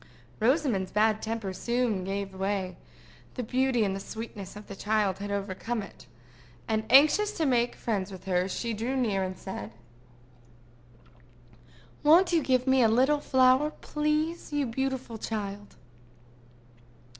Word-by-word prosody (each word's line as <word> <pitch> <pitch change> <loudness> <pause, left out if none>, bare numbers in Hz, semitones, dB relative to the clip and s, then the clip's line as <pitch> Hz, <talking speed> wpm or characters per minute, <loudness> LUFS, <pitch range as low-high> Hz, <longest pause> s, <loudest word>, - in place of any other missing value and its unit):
Rosamond's 235 - +1
bad 215 0 +2
temper 220 -3 -3
soon 235 0 -1
gave 195 +1 -4
way: 190 -1 -2 0.6
the 250 - -3
beauty 255 0 +1
and 195 -1 -2
sweetness 215 -3 -8
of 210 0 -10
the 200 - -9
child 210 -2 0
had 205 +1 -5
overcome 200 +3 -3
it; 195 - -13 0.6
and, 220 0 0
anxious 305 +10 +6
to 320 - +1
make 245 -3 +1
friends 200 -4 -2
with 190 0 -10
her, 185 0 0
she 230 +4 -3
drew 230 +5 -2
near, 215 -7 +1
and 185 -1 -3
said: 110 - -7 2.3
"Won't 340 +4 +5
you 330 - +4
give 255 -2 +1
me 265 -1 +4
a 230 - +6
little 260 +6 +3
flower, 260 +1 +4
please, 305 +3 -1
you 290 -1 0
beautiful 260 -1 -3
child?" 205 -2 -5
225 Hz, 135 wpm, -28 LUFS, 195-260 Hz, 2.3 s, anxious